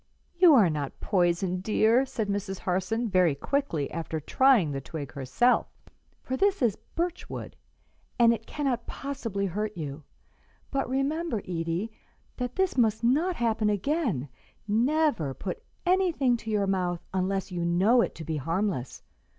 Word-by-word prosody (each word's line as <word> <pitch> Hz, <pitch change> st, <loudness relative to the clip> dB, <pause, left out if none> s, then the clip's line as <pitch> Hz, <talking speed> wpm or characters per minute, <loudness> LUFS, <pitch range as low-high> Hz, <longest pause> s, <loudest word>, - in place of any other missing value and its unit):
"You 345 Hz, -3 st, +6 dB
are 215 Hz, -8 st, +6 dB
not 145 Hz, -3 st, -4 dB
poisoned, 180 Hz, 0 st, +1 dB
dear," 225 Hz, +5 st, +3 dB
said 235 Hz, -5 st, -3 dB
Miss 200 Hz, -1 st, -2 dB
Harson, 190 Hz, +7 st, -1 dB
very 180 Hz, -7 st, +3 dB
quickly, 165 Hz, -, -1 dB
after 160 Hz, 0 st, -3 dB
trying 225 Hz, -, +3 dB
the 135 Hz, -1 st, -3 dB
twig 140 Hz, -1 st, -7 dB
herself; 140 Hz, -, +2 dB, 0.6 s
"for 260 Hz, -, -2 dB
this 395 Hz, 0 st, +2 dB
is 220 Hz, -5 st, +3 dB, 0.2 s
birch 345 Hz, +1 st, -2 dB
wood, -, -, -7 dB, 0.6 s
and 235 Hz, -1 st, +6 dB
it 225 Hz, 0 st, -6 dB
cannot 265 Hz, -5 st, -2 dB
possibly 235 Hz, -8 st, -3 dB
hurt 210 Hz, +2 st, -3 dB
you. 145 Hz, -2 st, -5 dB, 0.7 s
But 275 Hz, -2 st, -1 dB
remember, 275 Hz, -1 st, -1 dB
Edie, 170 Hz, +4 st, -3 dB, 0.5 s
that 250 Hz, -1 st, -3 dB
this 380 Hz, -8 st, +1 dB
must 220 Hz, -1 st, +2 dB
not 310 Hz, +10 st, +2 dB
happen 225 Hz, -4 st, +1 dB
again; 210 Hz, -, 0 dB, 0.4 s
never 230 Hz, -, +1 dB
put 185 Hz, -, -5 dB, 0.2 s
anything 350 Hz, -9 st, +3 dB
to 225 Hz, -, -8 dB
your 210 Hz, -2 st, +1 dB
mouth 180 Hz, -3 st, -1 dB
unless 190 Hz, 0 st, -1 dB
you 175 Hz, -1 st, -2 dB
know 190 Hz, +8 st, +4 dB
it -, -, -2 dB
to 160 Hz, -, -7 dB
be 160 Hz, 0 st, -3 dB
harmless. 165 Hz, -2 st, -2 dB
210 Hz, 150 wpm, -27 LUFS, 175-260 Hz, 0.7 s, You